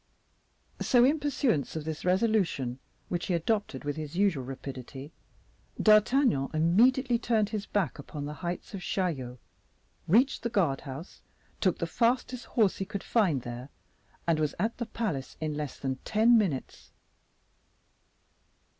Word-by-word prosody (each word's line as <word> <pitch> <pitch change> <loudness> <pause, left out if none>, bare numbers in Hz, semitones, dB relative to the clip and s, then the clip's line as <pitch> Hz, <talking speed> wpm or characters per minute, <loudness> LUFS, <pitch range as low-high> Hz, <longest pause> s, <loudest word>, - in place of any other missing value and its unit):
So, 245 -1 +4
in 295 +4 +3
pursuance 270 - 0
of 155 -1 -4
this 160 -1 -4
resolution, 180 - +1 0.3
which 175 -1 -3
he 180 - +1
adopted 185 - -1
with 145 +1 -3
his 155 0 -6
usual 190 -9 +2
rapidity, 135 +2 -8 0.7
D'Artagnan 215 - +4
immediately 235 - +4
turned 220 -3 +1
his 215 -2 -4
back 185 -10 -1
upon 145 0 -6
the 150 - -5
heights 175 +3 -4
of 195 - -5
Chaillot, 140 -11 -2 0.7
reached 245 +10 +3
the 235 - -2
guard 175 - +1
house, 140 +7 -9 0.4
took 185 -3 +2
the - - -1
fastest 245 +6 0
horse 215 -5 +2
he 195 - -3
could 200 +1 -5
find 175 - +2
there, 120 +3 -7 0.6
and 165 -2 +2
was 150 -2 0
at 220 +7 -1
the 235 - -3
palace 185 - -3
in 155 -1 -2
less 150 -2 -4
than 130 -1 -3
ten 220 - +3
minutes. 185 - -1
180 Hz, 145 wpm, -29 LUFS, 145-225 Hz, 0.7 s, So